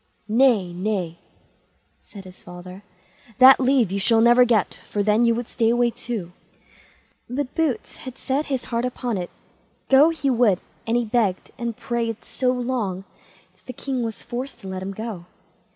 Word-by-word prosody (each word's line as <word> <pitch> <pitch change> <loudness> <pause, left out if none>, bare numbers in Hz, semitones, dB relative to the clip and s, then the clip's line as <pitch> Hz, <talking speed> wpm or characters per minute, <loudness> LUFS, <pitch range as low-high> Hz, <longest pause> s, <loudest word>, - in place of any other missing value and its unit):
"Nay, 220 -6 +3
nay!" 180 -3 -3 0.8
said 200 -2 -12
his 185 0 -14
father; 180 +2 -11 0.6
"that 265 +1 +8
leave 255 -6 +2
you 200 - -1
shall 225 +3 +3
never 240 +2 +6
get, 225 -5 +1
for 205 - -1
then 215 +3 +3
you 230 -1 +3
would 240 0 -4
stay 225 -2 +1
away 240 0 +2
too." 220 -8 -5 1.0
But 260 +1 -3
Boots 315 -6 -2
had 260 -1 -9
set 275 +4 -2
his 265 -3 -2
heart 230 +1 0
upon 245 -4 -2
it; 175 - -5 0.6
go 275 +4 +7
he 285 -4 -1
would; 230 -7 +3 0.3
and 230 +1 +2
he 240 - 0
begged 215 -5 0
and 235 -2 -3
prayed 230 -2 -3
so 255 -1 -1
long 240 -7 -2 0.5
that - - -33
the 255 - -6
king 260 +1 -3
was 225 -3 -5
forced 250 +1 -6
to 195 - -9
let 190 0 -5
him 190 +1 -4
go. 215 -6 -6
235 Hz, 170 wpm, -23 LUFS, 200-250 Hz, 1.0 s, that